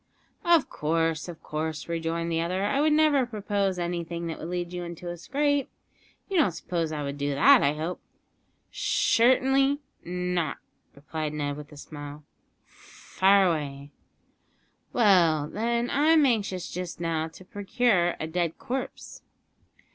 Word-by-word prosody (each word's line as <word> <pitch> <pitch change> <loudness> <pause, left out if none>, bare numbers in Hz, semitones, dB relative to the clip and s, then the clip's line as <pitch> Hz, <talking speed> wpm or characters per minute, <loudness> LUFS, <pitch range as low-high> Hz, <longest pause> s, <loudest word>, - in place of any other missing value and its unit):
"Of 340 -4 +4
course, 165 +1 -1
of 170 -2 -9
course," 155 -1 -4
rejoined 165 0 -2
the 165 0 +1
other; 180 +3 -1
"I 270 +8 +1
would 310 +1 +3
never 300 -3 +4
propose 205 -4 -1
anything 170 -1 -3
that 165 -1 -5
would 160 - -6
lead 175 0 -3
you 175 0 -4
into 175 0 -6
a - - -5
scrape. 285 - 0 0.6
You 390 - -1
don't 230 - +3
suppose 165 -1 -3
I 150 -1 -3
would 140 0 -5
do 145 0 -1
that, 265 - +7
I 140 - +2
hope?" 165 +4 -4 0.7
"Shertenly 265 +3 +3 0.3
not," 180 -3 -2 0.4
replied 150 +2 -4
Ned 145 -1 -2
with 150 0 -10
a 150 - -12
smile; 145 0 -9 0.4
"fire 195 +1 +1
away." 145 -4 -2 1.0
"Well, 170 -9 +4
then, 235 +5 -1
I'm 305 +1 +4
anxious 200 -7 0
just 180 -1 -5
now 165 -2 -1
to 165 +3 -14
procure 200 -3 +1
a - - -2
dead 165 0 -2
corpse." 260 +1 -5
175 Hz, 145 wpm, -27 LUFS, 160-230 Hz, 1.0 s, that